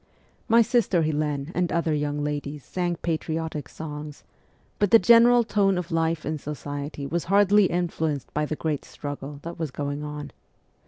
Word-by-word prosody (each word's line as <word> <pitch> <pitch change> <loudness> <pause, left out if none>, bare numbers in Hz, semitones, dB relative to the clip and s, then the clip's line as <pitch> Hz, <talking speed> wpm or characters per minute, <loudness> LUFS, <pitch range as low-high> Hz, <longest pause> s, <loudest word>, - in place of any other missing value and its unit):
My 230 +1 +6
sister 205 -7 +2
Helene 150 -1 -1
and 180 -1 0
other 170 -2 +1
young 145 0 -1
ladies 145 -1 -4
sang 175 -1 -1
patriotic 160 -2 -2
songs, 150 -1 -8 0.6
but 205 - +3
the 230 - +9
general 235 +4 +6
tone 200 -3 +2
of 180 0 -4
life 165 -1 0
in 155 0 -2
society 145 0 -5
was 170 +4 -2
hardly 205 +2 +5
influenced 160 -6 -2
by 150 0 0
the 155 - -2
great 150 -2 -2
struggle 145 0 -7
that 170 0 -7
was 160 -2 -2
going 145 +2 -4
on. 150 0 -6
160 Hz, 160 wpm, -25 LUFS, 150-180 Hz, 0.6 s, the